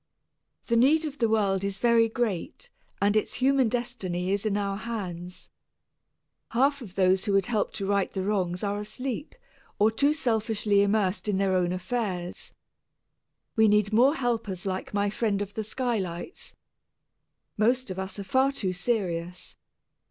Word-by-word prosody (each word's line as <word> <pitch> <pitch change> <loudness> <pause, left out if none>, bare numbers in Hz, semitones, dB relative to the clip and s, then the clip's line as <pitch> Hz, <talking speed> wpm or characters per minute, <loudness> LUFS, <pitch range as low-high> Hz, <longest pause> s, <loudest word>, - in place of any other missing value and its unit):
The 235 - +1
need 295 +7 +4
of 290 -1 -6
the 230 -3 +2
world 200 -3 +1
is 200 -1 -2
very 230 0 +4
great 240 - -3 0.3
and 205 +1 +2
its 215 - 0
human 265 -2 +3
destiny 205 -7 -2
is 200 +2 0
in 205 -1 0
our 200 -1 -1
hands. 185 -6 -6 1.0
Half 275 +4 +2
of 200 -7 -10
those 190 +1 +3
who 205 - 0
could 195 0 +3
help 220 -4 0
to 200 - -3
right 200 -1 +1
the 190 - -3
wrongs 185 -3 -1
are 205 0 -1
asleep 250 +6 -5 0.4
or 215 +2 +4
too 280 +6 +2
selfishly 220 -7 +1
immersed 200 -1 +1
in 205 -2 +1
their 195 -1 +1
own 180 -1 +2
affairs. 185 -2 -3 1.0
We 220 -1 +5
need 210 0 +3
more 260 +7 +5
helpers 225 - -2
like 190 -1 -3
my 205 0 0
friend 215 -2 0
of 205 0 -4
the 220 - -3
skylights. 215 - -4 1.0
Most 240 +1 +1
of 185 - -5
us 190 +1 -5
are 200 - -4
far 260 +7 +2
too 195 -9 -2
serious. 180 -3 -3
210 Hz, 160 wpm, -27 LUFS, 190-235 Hz, 1.0 s, We